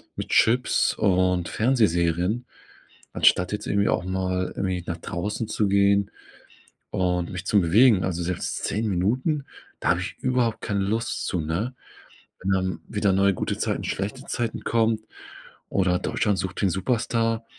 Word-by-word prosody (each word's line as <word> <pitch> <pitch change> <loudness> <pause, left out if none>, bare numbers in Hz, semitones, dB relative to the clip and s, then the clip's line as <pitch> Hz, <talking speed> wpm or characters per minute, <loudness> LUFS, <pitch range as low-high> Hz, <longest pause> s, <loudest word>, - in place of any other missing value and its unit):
mit - - -5
Chips 120 +3 +3
und 90 -2 +2
Fernsehserien, 105 -2 +1 0.7
anstatt 90 - +3
jetzt 105 0 -4
irgendwie 100 0 +2
auch - - +1
mal 95 0 -1
irgendwie 95 -3 -2
nach 85 - -3
draußen 105 +7 -4
zu 105 - 0
gehen 100 0 +3 0.8
und 90 -2 0
mich 90 +1 -6
zu 105 - +4
bewegen. 100 +4 +5
Also, 90 -2 -2
selbst 90 0 -3
10 110 +2 -1
Minuten, 130 - 0 0.3
da - - -1
habe - - +1
ich - - -5
überhaupt 125 -3 0
keine 100 -1 -1
Lust 115 +5 -2
zu, 90 - -1
ne? 85 +11 -2 0.7
Wenn 95 - -2
dann 95 -2 -1
wieder 105 -2 +1
neue 100 +1 +3
„Gute - - -2
Zeiten, - - -1
schlechte 105 +8 -3
Zeiten” 120 -2 -3
kommen 115 -1 +2 0.7
oder 90 -2 +1
„Deutschland 100 -3 0
sucht 95 0 -4
den 95 - +3
Superstar” 115 +3 0
100 Hz, 150 wpm, -25 LUFS, 90-115 Hz, 0.8 s, bewegen